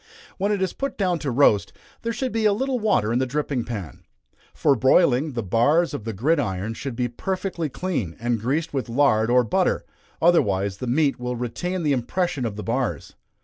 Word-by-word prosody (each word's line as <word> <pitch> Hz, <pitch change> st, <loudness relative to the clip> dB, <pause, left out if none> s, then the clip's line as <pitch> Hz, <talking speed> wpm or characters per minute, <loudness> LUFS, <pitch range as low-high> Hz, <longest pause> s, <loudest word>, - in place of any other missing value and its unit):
When 200 Hz, +2 st, +1 dB
it 200 Hz, -2 st, 0 dB
is 185 Hz, -, -1 dB
put 275 Hz, -1 st, -4 dB
down 180 Hz, -4 st, +1 dB
to 145 Hz, -, -3 dB
roast, 120 Hz, -5 st, +3 dB, 0.3 s
there 230 Hz, -, -2 dB
should 255 Hz, +2 st, -2 dB
be 225 Hz, -1 st, 0 dB
a 210 Hz, -, +5 dB
little 260 Hz, +3 st, -1 dB
water 115 Hz, -, +1 dB
in 120 Hz, -, +2 dB
the 130 Hz, -, 0 dB
dripping 140 Hz, -2 st, -1 dB
pan. 100 Hz, -9 st, -6 dB, 0.5 s
For 145 Hz, -3 st, +2 dB
broiling, 135 Hz, +2 st, +3 dB
the 115 Hz, -2 st, -2 dB
bars 145 Hz, -, +2 dB
of 115 Hz, -7 st, -5 dB
the 115 Hz, -, -2 dB
gridiron 110 Hz, -, 0 dB
should 130 Hz, +2 st, -6 dB
be 125 Hz, 0 st, 0 dB
perfectly 180 Hz, -, -3 dB
clean, 135 Hz, -, -3 dB
and 120 Hz, -2 st, -1 dB
greased 145 Hz, +8 st, -1 dB
with 130 Hz, -3 st, -2 dB
lard 115 Hz, -3 st, +3 dB
or 125 Hz, +1 st, +5 dB
butter, 115 Hz, -, 0 dB, 0.3 s
otherwise 100 Hz, -, +2 dB
the 125 Hz, -, -5 dB
meat 140 Hz, +2 st, +1 dB
will 125 Hz, 0 st, -3 dB
retain 170 Hz, +10 st, -3 dB
the 150 Hz, -2 st, +2 dB
impression 135 Hz, +2 st, -1 dB
of 105 Hz, -, -6 dB
the 105 Hz, -, -6 dB
bars. 120 Hz, +4 st, -2 dB
135 Hz, 195 wpm, -23 LUFS, 115-175 Hz, 0.5 s, a